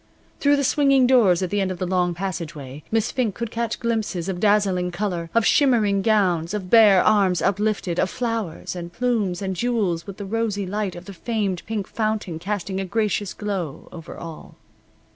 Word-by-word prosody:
Through 285 0 +4
the 280 - 0
swinging 275 -1 +4
doors 215 -9 +4
at 180 - -3
the 205 0 +1
end 190 - 0
of 185 - -4
the 185 - -2
long 180 -1 0
passageway 160 -7 -5
Miss 220 0 0
Fink 235 -6 -1
could 235 -1 -4
catch 230 -1 -2
glimpses 220 -7 -2
of 185 -2 -3
dazzling 195 -3 +2
color, 175 -2 -3
of 230 -1 +3
shimmering 220 -8 +3
gowns, 190 -4 +1
of 185 -3 -5
bare 210 -5 +7
arms 195 -4 +3
uplifted, 200 -3 0
of 190 - +2
flowers, 225 -9 -3
and 170 -1 -6
plumes, 210 -5 -1
and 190 -1 -2
jewels, 200 -7 -1
with 200 - -8
the 205 - -6
rosy 210 -1 -1
light 200 -1 -3
of 175 +1 -10
the 200 - -9
famed 200 -2 -2
pink 215 -3 -2
fountain 215 -7 -2
casting 195 +1 -3
a 195 - -2
gracious 210 -1 -1
glow 190 -9 -5
over 165 -1 -9
all. 165 -2 -9
200 Hz, 185 wpm, -23 LUFS, 180-220 Hz, -, bare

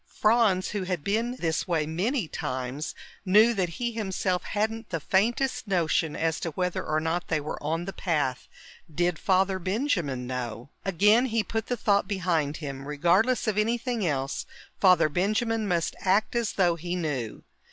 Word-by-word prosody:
Franz, 215 -4 +2
who 205 - -2
had 180 -5 -2
been 230 +5 0
this 165 -2 -1
way 165 -4 +1
many 190 - -1
times, 130 +2 -4 0.3
knew 215 +4 +5
that 190 -5 0
he 240 -1 -1
himself 190 -4 -1
hadn't 220 +2 -2
the 165 - -2
faintest 230 - +1
notion 165 -4 +1
as 160 -1 0
to 165 - -3
whether 180 +2 -1
or 155 0 0
not 165 +2 -2
they 160 - +1
were 150 +1 -5
on 165 +3 -2
the 195 - -5
path. 145 -8 -1 0.4
Did 175 +1 0
Father 190 0 +2
Benjamin 180 - -1
know? 125 -1 -5
Again 210 +7 +4
he 225 -2 0
put 225 +1 -3
the 245 - -1
thought 200 -2 +2
behind 170 -7 0
him. 140 -3 -6
Regardless 185 - +2
of 210 -1 +1
anything 235 +1 0
else, 140 -5 -2 0.3
Father 180 -5 +5
Benjamin 215 +7 0
must 170 -3 0
act 200 +5 +1
as 235 -4 0
though 175 -3 +3
he 175 +2 -3
knew. 140 -10 -3
185 Hz, 165 wpm, -27 LUFS, 160-215 Hz, 0.4 s, knew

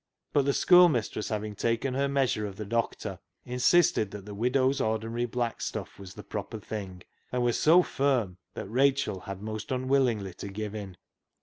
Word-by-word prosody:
But 140 -2 +3
the 140 - +2
schoolmistress, 155 - +4
having 105 -1 -3
taken 115 +5 -1
her 140 +2 +1
measure 135 -6 0
of 100 - -8
the 105 - -6
doctor, 115 +2 -2 0.3
in 125 0 -4
sisted 145 - +4
that 100 -1 -9
the 105 - -8
widow's 130 +5 +1
ordinary 115 +2 -1
black 120 -1 -2
stuff - - -5
was 95 -2 -10
the - - -9
proper - - -5
thing, 95 -4 -7 0.3
and 125 -1 0
was 120 -1 +1
so 170 +4 +6
firm 125 - 0 0.2
that - - -5
Rachel 135 -1 +1
had 100 +1 -8
most 110 +1 -5
unwillingly 125 -7 +1
to 100 - -8
give 105 +1 -5
in. 100 -4 -7
115 Hz, 180 wpm, -28 LUFS, 105-135 Hz, 0.3 s, so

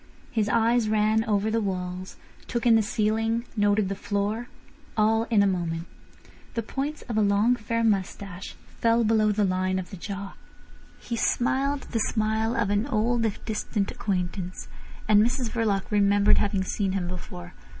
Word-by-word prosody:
His 215 -3 0
eyes 230 0 +3
ran 215 +1 +3
over 210 0 +1
the 225 +1 +1
walls, 185 -2 -4 0.3
took 235 -1 -2
in 235 - +6
the 225 - +5
ceiling, 225 +2 0
noted 205 -1 +2
the 195 - -2
floor—all 220 +3 -2
in 215 -4 +3
a - - +3
moment. 170 -3 -1 0.7
The 230 - -1
points 280 +7 -4
of 230 -3 -4
a - - +4
long 205 +4 +3
fair 230 0 -2
moustache 195 -3 -2 0.2
fell 230 0 +3
below 215 -1 +3
the 210 0 +1
line 185 0 0
of 180 -1 -5
the 195 - -7
jaw. 195 +1 -6 0.7
He 235 - -4
smiled 270 +4 +1
the 230 - 0
smile 220 +1 0
of 210 -5 +1
an 205 +5 +1
old 230 -1 +1
if 205 - -6
distant 210 -2 -2
acquaintance, 185 -2 -3 0.4
and 210 -1 +6
Mrs 240 +1 0
Verloc 210 -4 0
remembered 205 0 +4
having 200 -2 0
seen 190 0 -1
him 185 -3 -1
before. 170 - -7
215 Hz, 160 wpm, -26 LUFS, 195-230 Hz, 0.7 s, in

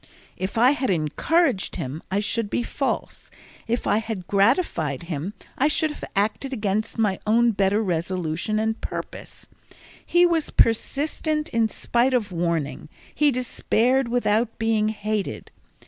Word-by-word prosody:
If 190 +4 -4
I 245 +4 +6
had 275 -3 -1
encouraged 190 - +1
him, 140 +5 -5
I 200 +2 0
should 215 0 -1
be 240 - -1
false; 275 +3 -3 0.4
if 235 +1 -1
I - - +3
had 220 -5 -5
gratified 195 - +1
him, 170 +4 -4 0.2
I 280 - +4
should 310 +1 +1
have - - -10
acted 210 +7 0
against 215 -3 -2
my 210 -4 +1
own 235 +2 +4
better 205 +1 +1
resolution 175 +1 -1
and 220 +1 -1
purpose. - - -7 0.6
He 350 0 +4
was 335 -3 +1
persistent 300 +6 +1
in 225 -1 +1
spite 245 +4 +1
of 215 -5 0
warning, 165 -4 -2 0.2
he 300 -1 +3
despaired 255 0 +1
without 235 -1 +1
being 220 -1 +1
hated. 215 -1 -3
220 Hz, 140 wpm, -24 LUFS, 190-250 Hz, 0.6 s, I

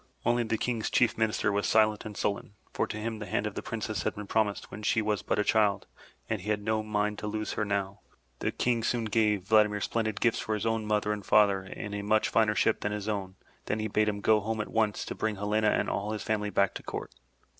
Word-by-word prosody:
Only 120 0 +3
the 110 -1 -1
King's 115 -1 -1
Chief 120 - +3
Minister 110 -1 +1
was 100 -1 0
silent 110 -1 +3
and 105 -2 -7
sullen, 100 0 -2 0.2
for - - 0
to - - -5
him 110 0 -4
the 105 - -6
hand 100 - -1
of 105 - -3
the - - -4
Princess 110 -2 -3
had - - -2
been 105 - -6
promised 105 -1 0
when 105 - -7
she 110 +2 +2
was 105 -1 0
but - - -1
a 105 - +3
child 105 -2 +2 0.4
and 110 -3 -2
he 105 - -6
had 105 -1 0
no 110 0 +1
mind 105 -1 -1
to 105 - -4
lose 110 0 -3
her - - -1
now. 100 -1 -2 0.4
The - - -1
King 120 -2 0
soon 115 0 0
gave 105 -3 +2
Vladimir 105 0 +4
splendid 110 0 -1
gifts 115 -2 +2
for 110 - -1
his 105 - -3
own 115 -1 0
mother 105 0 +1
and 105 -1 -6
father 100 -1 +4
and 100 +2 -7
a 100 - -3
much 110 +1 +2
finer 110 -2 +3
ship 110 - +2
than 105 - -1
his 105 0 -4
own, 100 -3 -3 0.3
then 105 - 0
he 110 0 -2
bade 105 +1 +2
him 100 -1 -3
go 110 +1 +4
home 110 +2 -3
at 105 - -3
once 110 -2 +1
to - - -4
bring 110 -1 -2
Helena 105 +2 +1
and - - +1
all 105 +2 -2
his 110 - -4
family 105 -1 -1
back 100 -1 +2
to - - -6
court. - - -6
105 Hz, 250 wpm, -29 LUFS, 105-110 Hz, 0.4 s, Vladimir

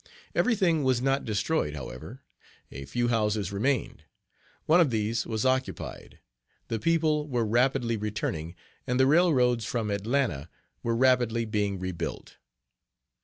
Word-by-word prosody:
Every 250 - +2
thing 170 -6 +2
was 130 -2 +2
not 135 +2 0
destroyed, 105 - -1
however. 70 - -8 0.5
A 70 +1 -7
few 120 - -1
houses 105 -4 0
remained. 120 +6 -1 0.6
One 170 +3 +5
of 160 - +3
these 110 0 -1
was 110 0 -2
occupied. 130 0 -2 0.5
The 115 - -1
people 155 +2 +1
were 120 -5 0
rapidly 120 +1 +1
returning, 95 -6 -3 0.3
and 125 0 0
the 130 - +6
railroads 135 -7 +3
from 110 -1 -2
Atlanta 100 - -1 0.3
were 115 0 -1
rapidly 120 -2 +2
being 105 -2 -1
rebuilt. 90 -3 -5
115 Hz, 130 wpm, -27 LUFS, 105-135 Hz, 0.6 s, the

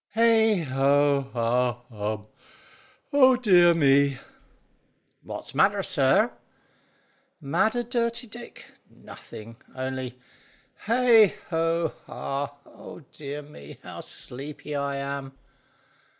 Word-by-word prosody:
"Heigh 220 -4 +4
Ho 140 0 +2
Ha 120 +1 +1
Hum! 110 -3 -6 0.9
Oh 260 -2 +6
dear 180 -8 +5
me!" 140 -3 +3 1.0
"What's - - -8
matter, - - +3
sir?" - - +2 1.1
"Matter, 220 - 0
Dirty 235 0 -1
Dick? 240 +1 -12 0.2
Nothing; 115 +1 -12 0.2
only, 130 -1 -5 0.7
heigh 230 -3 +5 0.2
ho 165 0 0
ha! 140 +1 -4
Oh - - -12
dear 145 0 -7
me, 75 - -13
how - - -9
sleepy 145 +3 -8
I 140 -1 -2
am!" 140 -1 -5
145 Hz, 95 wpm, -26 LUFS, 130-215 Hz, 1.1 s, Oh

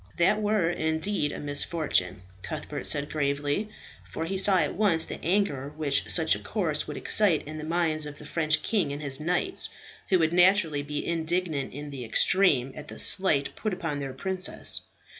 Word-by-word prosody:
"That 205 +5 +3
were 210 -4 +1
indeed 160 0 -1
a - - -7
misfortune," 145 - -1 0.2
Cuthbert - - -5
said 145 0 +2
gravely, 145 +6 -2 0.3
for 160 - -6
he 190 +4 -4
saw 190 0 +3
at 155 -4 +1
once 175 -5 +3
the - - -8
anger 155 -7 -1
which 145 -3 0
such 160 -2 +3
a - - -3
course 165 -9 -2
would 150 - -6
excite 195 -8 +3
in 155 +1 -7
the - - -7
minds 160 -2 -1
of 145 -1 -10
the 150 - -12
French 155 0 -1
king 190 -10 0
and 145 +1 -6
his 135 -2 0
knights, 180 - +1 0.4
who 185 - +4
would 160 -1 0
naturally 180 -4 +3
be 145 +1 -5
indignant 165 -3 -2
in 145 +2 -8
the 135 -3 -7
extreme 135 - +2
at 150 - -9
the - - -10
slight 185 -8 +4
put 215 -4 -3
upon 165 -6 -4
their 135 -1 -5
princess. 185 +6 +2
160 Hz, 180 wpm, -26 LUFS, 145-185 Hz, 0.4 s, who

